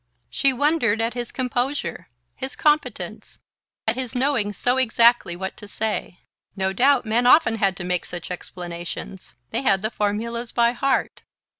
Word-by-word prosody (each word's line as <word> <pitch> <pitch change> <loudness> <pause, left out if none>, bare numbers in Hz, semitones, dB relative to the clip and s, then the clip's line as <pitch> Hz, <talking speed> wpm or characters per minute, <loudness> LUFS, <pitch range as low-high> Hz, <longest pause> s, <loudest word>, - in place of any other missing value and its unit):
She 275 - +3
wondered 260 -5 +2
at 230 +1 0
his 240 -1 -5
composure, 250 - -2 0.3
his 265 0 -5
competence, 300 0 -1 0.5
at 220 - +1
his 255 -1 -4
knowing 250 -5 +1
so 245 +6 0
exactly 235 -6 +4
what 190 +1 -5
to 205 - -10
say. 210 -4 -3 0.3
No 190 -1 -1
doubt 260 +4 +3
men 235 +3 +2
often 245 -5 +5
had 195 -3 +1
to 190 - -5
make 180 0 -1
such 175 0 -7
explanations: 175 +1 -7 0.2
they - - -1
had 195 -7 +2
the 215 - -1
formulas 230 +3 -2
by 235 0 +3
heart... 265 +2 0
230 Hz, 155 wpm, -23 LUFS, 195-255 Hz, 0.5 s, often